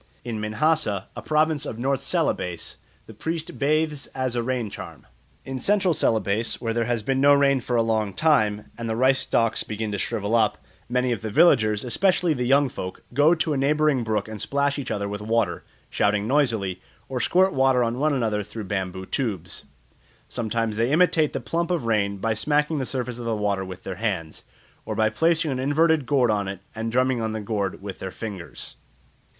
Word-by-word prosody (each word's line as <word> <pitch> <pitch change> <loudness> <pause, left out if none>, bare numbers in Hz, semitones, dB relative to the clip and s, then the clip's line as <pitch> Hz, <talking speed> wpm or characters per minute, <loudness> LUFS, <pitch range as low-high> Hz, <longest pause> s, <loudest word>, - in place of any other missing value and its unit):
In 115 -3 -3
Minahassa, 110 -2 +1
a - - -6
province 155 -1 +1
of 115 - -5
North 135 +2 -1
Celebes, 85 -2 -1 0.3
the 110 - -12
priest 160 +8 -4
bathes 150 0 0
as 130 -2 -1
a 120 - +1
rain 120 -3 -2
charm. - - -9 0.4
In 135 -1 -4
Central 195 +3 +2
Celebes 110 -3 +1
when 115 -1 -2
there 115 0 0
has 120 -2 -1
been 135 +3 0
no 145 0 +7
rain 140 -1 +3
for 125 0 -3
a 115 - +3
long 110 -2 0
time 110 -10 +2
and 115 -1 -3
the 110 - -1
rice 130 +3 +3
stalks 115 -1 +1
begin 110 0 -4
to 100 - -3
shrivel 105 +3 -2
up, 110 -3 +3 0.3
many 125 0 +1
of 115 -5 -2
the 110 - -4
villagers, 110 -5 +4
especially 180 +5 +2
the 125 -3 -2
young 140 +2 +4
folk, 95 -7 -7
go 150 +6 +5
to 160 -1 0
a - - -1
neighbouring 145 -1 +2
brook 110 -1 -1
and 110 -1 -7
splash 140 +1 0
each 135 - -5
other 100 -1 -2
with 105 +1 -5
water, 110 -4 0 0.3
shouting 105 0 +1
noisily, 115 -9 +1 0.3
or 130 -1 -3
squirt 185 +8 +3
water 130 -2 +3
on 120 +2 -1
one 155 +2 +2
another 110 -6 0
through 110 +2 -7
bamboo 95 -1 -3
tubes. 95 - -3 0.6
Sometimes 115 -2 -2
they 115 +3 +1
imitate 160 -2 +3
the - - -3
plump 170 +1 -2
of 175 -8 -1
rain 100 -3 +1
by 110 +3 0
smacking 150 +6 +1
the 130 - -2
surface 125 -2 -3
of 120 - -6
the 115 -1 0
water 100 -2 0
with 95 0 -9
their 95 -2 -5
hands, 95 -8 -3 0.4
or 110 - -4
by 110 0 +2
placing 160 +4 +2
an 130 - -2
inverted 150 +1 +2
gourd 130 -5 +3
on 100 -2 0
it 95 -1 -6
and 115 0 -3
drumming 130 0 +2
on 110 -1 -2
the 110 - -3
gourd 100 -3 -3
with 100 -2 -6
their 95 - -4
fingers. 100 -3 -7
115 Hz, 200 wpm, -24 LUFS, 105-140 Hz, 0.6 s, no